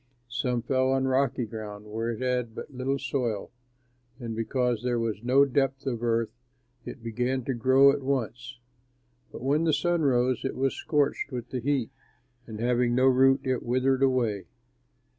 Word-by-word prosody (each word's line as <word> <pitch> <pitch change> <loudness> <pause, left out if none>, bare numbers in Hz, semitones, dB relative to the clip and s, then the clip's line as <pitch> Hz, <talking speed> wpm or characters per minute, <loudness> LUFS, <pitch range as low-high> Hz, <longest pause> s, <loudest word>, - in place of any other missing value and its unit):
Some 125 -2 -1
fell 130 +1 +1
on 135 0 +1
rocky 130 -1 +1
ground, 105 -1 -8
where 110 +2 -3
it 115 +1 -4
had 125 -3 -1
but 140 - -8
little 130 +2 -1
soil, 120 -8 -2 0.7
and 115 -3 -5
because 120 0 0
there 125 -1 0
was 115 -2 -2
no 130 +4 +4
depth 135 0 0
of 120 -4 -2
earth 115 -1 +1 0.5
it 120 - -9
began 125 +3 -1
to 135 - -1
grow 130 +3 +5
at 140 0 -3
once; 130 -2 -3 0.7
but - - -9
when 145 +4 +2
the 160 -2 +2
sun 170 +3 +1
rose, 130 -3 +2
it 135 - -3
was 135 0 0
scorched 145 -2 0
with 125 -2 -5
the 130 - -2
heat, 130 -1 -1 0.6
and 110 -2 -7
having 120 0 +1
no 130 +1 +3
root 135 +1 +5
it 130 -2 -1
withered 130 +2 +1
away. 120 -8 +1
125 Hz, 170 wpm, -27 LUFS, 120-135 Hz, 0.7 s, grow